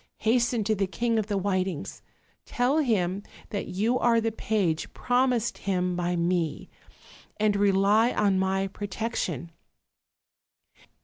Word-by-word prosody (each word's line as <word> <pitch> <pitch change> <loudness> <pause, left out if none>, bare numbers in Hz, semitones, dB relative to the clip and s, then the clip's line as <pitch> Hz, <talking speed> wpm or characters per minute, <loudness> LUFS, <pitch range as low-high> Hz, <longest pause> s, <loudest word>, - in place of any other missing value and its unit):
Hasten 235 0 +2
to 215 +2 +1
the 195 -2 0
King 230 +3 0
of 210 - -2
the 205 -2 -1
Whitings; 185 -4 -2 0.5
tell 255 +5 +1
him 200 - +1 0.3
that 200 - -3
you 220 +7 0
are 235 -1 +3
the 225 0 0
page 200 -7 -1
promised 245 -2 +1
him 180 -2 -1
by 175 0 -1
me; 170 -2 -1 0.7
and 210 -1 +2
rely 200 +3 +3
on 195 -2 +2
my 190 0 +1
protection." 195 - -4
200 Hz, 125 wpm, -27 LUFS, 185-230 Hz, 0.7 s, are